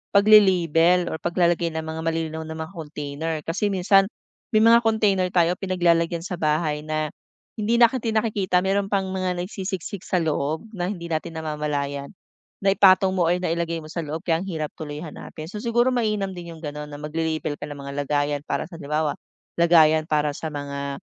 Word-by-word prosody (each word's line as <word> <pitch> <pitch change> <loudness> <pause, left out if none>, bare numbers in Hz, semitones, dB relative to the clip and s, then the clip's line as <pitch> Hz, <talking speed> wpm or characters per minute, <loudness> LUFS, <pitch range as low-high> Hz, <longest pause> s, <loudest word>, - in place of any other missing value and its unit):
pagle-label 180 -4 +5
or 160 - -4
paglalagay 175 -1 +1
ng 160 - -2
mga 160 0 -5
malilinaw 160 -1 -2
na 160 - -6
mga 160 +3 -6
container. 155 -1 -5
Kasi 180 +7 -1
minsan 195 0 +4 0.5
may 215 - +6
mga 230 +1 +7
container 215 -5 +2
tayo 175 0 +2
pinaglalagyan 170 -3 +1
sa 180 -2 -5
bahay 150 0 +1
na 155 0 -3 0.5
hindi 215 +3 +1
natin 235 -1 +3
nakikita, 195 -5 0
mayro'n 195 +1 +1
pang 195 -2 -1
mga 185 -1 -1
nagsisisik 190 0 -5
sa 180 -3 +1
loob 160 +7 -2
na 180 -4 -3
hindi 170 -4 -5
natin 160 +1 -3
namamalayan. 150 -3 -3 0.5
Naipatong 195 -1 +5
mo 180 -3 +2
or 175 - +3
nailagay 170 -1 -1
mo - - -10
sa 170 - -4
loob, 160 +4 -5
kaya 165 -2 +2
ang 195 - -6
hirap 155 -4 -3
tuloy 150 -1 -6
hanapin. 155 0 -9
So 210 - -5
siguro 240 +2 +2
mainam 215 -5 0
din 175 -1 -8
'yong 160 - -15
gano'n 150 0 -5
na - - -7
magle-label 155 0 -2
ka 145 - -6
ng 145 - -7
mga 140 0 -7
lagayan 145 0 0
para - - -1
sa 165 -2 -11
halimbawa, 150 0 -1 0.4
lagayan 160 -2 +5
para 150 -1 +1
sa 160 - -5
mga 140 -1 -5
170 Hz, 180 wpm, -24 LUFS, 155-190 Hz, 0.5 s, mga